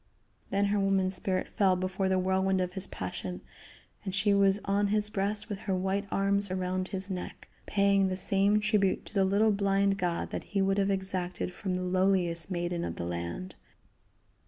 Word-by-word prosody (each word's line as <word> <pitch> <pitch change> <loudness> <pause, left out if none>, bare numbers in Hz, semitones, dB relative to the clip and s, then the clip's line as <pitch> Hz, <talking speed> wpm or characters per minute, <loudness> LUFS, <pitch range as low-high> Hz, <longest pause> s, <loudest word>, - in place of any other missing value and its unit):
Then 200 +1 +1
her 205 - +2
woman 195 -1 +2
spirit 185 0 -1
fell 190 -2 +2
before 185 +1 -1
the 190 - +2
whirlwind 190 +1 +1
of 180 -1 -1
his 190 0 +1
passion, 90 0 -6 0.6
and 190 -1 -3
she 205 0 +3
was 200 0 +3
on 200 +1 +1
his 210 +1 0
breast 205 +1 0
with 205 -3 -5
her 190 - +2
white 195 +2 -1
arms 200 0 +1
around 185 0 -2
his 190 0 -2
neck, 180 -1 -6 0.2
paying 200 -1 +3
the 185 -1 -2
same 200 +2 +2
tribute 210 -3 +1
to - - -7
the 195 -2 +3
little 200 +3 +3
blind 200 0 +1
god 175 -2 -2
that - - -4
he 205 - -2
would 195 +1 +2
have 195 0 +1
exacted 190 -2 -2
from 185 0 -3
the 185 - -2
lowliest 180 -2 +1
maiden 175 -1 -2
of - - -4
the 85 - -4
land. 85 - -5
190 Hz, 185 wpm, -29 LUFS, 185-200 Hz, 0.6 s, she